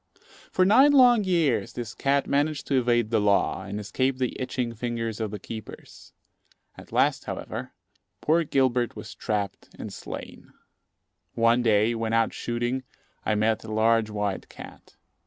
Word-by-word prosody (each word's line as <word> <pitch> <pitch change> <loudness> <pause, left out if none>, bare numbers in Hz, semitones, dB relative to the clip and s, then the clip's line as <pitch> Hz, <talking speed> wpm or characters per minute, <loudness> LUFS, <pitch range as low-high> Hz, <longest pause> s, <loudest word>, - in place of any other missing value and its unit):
For 185 - +3
nine 265 +9 +6
long 245 -6 +6
years 160 -10 +1
this 120 -4 -6
cat 140 0 +1
managed 145 +1 0
to 135 -2 +2
evade 120 -2 +1
the 110 -2 +2
law, 100 -1 +2
and 100 +1 -5
escape 130 +5 -1
the 130 -1 -2
itching 125 -2 -2
fingers 115 -1 -3
of 110 -1 -2
the 105 - -5
keepers. 110 +1 -10 0.6
At - - -14
last, - - +2
however, 125 +4 -6 0.5
poor 165 +7 +2
Gilbert 130 -5 +1
was - - -8
trapped 105 -2 -3
and - - -7
slain. - - -9 0.8
One 115 +1 +3
day, 110 0 +3
when 115 -1 -2
out 115 -1 +2
shooting, 120 +2 -2 0.5
I 110 - +2
met 110 +1 +1
a 110 - -8
large 110 0 +2
white 105 -2 -3
cat. - - -13
120 Hz, 155 wpm, -26 LUFS, 110-135 Hz, 0.8 s, nine